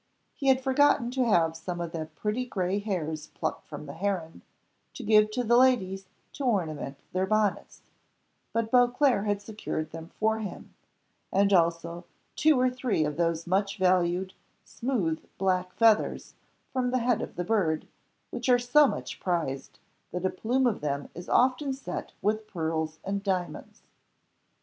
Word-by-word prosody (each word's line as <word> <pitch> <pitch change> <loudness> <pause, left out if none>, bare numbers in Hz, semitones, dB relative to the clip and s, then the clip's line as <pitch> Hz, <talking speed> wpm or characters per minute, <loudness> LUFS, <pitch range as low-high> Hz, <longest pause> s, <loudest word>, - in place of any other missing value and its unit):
He 275 - -4
had 265 -1 +5
forgotten 265 -2 +3
to 255 -1 +1
have 165 -5 +3
some 175 +2 -5
of 170 -1 -4
the 160 -2 -4
pretty 210 +8 -1
grey 195 -5 -1
hairs 160 -7 -3
plucked - - -4
from 150 0 -8
the 140 - -8
heron, 180 -3 -3 0.5
to 255 - -7
give 215 0 +5
to 245 +3 -2
the 235 +1 +3
ladies 195 -7 +3 0.3
to 285 - -6
ornament 160 - -1 0.2
their 185 +1 0
bonnets, 215 -1 0 0.7
but 230 -1 -1
Beauclerc 245 -3 +3
had 205 0 0
secured 205 -7 -4
them 165 0 -8
for 220 +1 +2
him, 205 -5 -7 0.6
and 200 +1 +3
also 170 0 +1 0.3
two 305 -4 +4
or 255 - +4
three 250 -10 0
of 150 0 -2
those 165 0 0
much 195 +3 0
valued, 185 0 +2 0.3
smooth, 205 -11 -2
black 185 -1 0
feathers, 225 -2 +3 0.4
from 255 -1 0
the 255 - +1
head 245 -2 +1
of - - -6
the 175 - -2
bird, 175 -7 +1 0.4
which 245 +1 -3
are 250 - +7
so 245 +5 +5
much - - -5
prized 165 -7 -2 0.3
that 180 +1 -3
a 185 - +2
plume 245 +7 0
of 235 -4 +1
them 140 -1 -2
is 175 - -9
often 265 +2 +3
set 265 -10 -6
with 215 +1 0
pearls 160 -2 -2
and 200 +1 -2
diamonds. 185 -3 -3
195 Hz, 160 wpm, -28 LUFS, 170-240 Hz, 0.7 s, are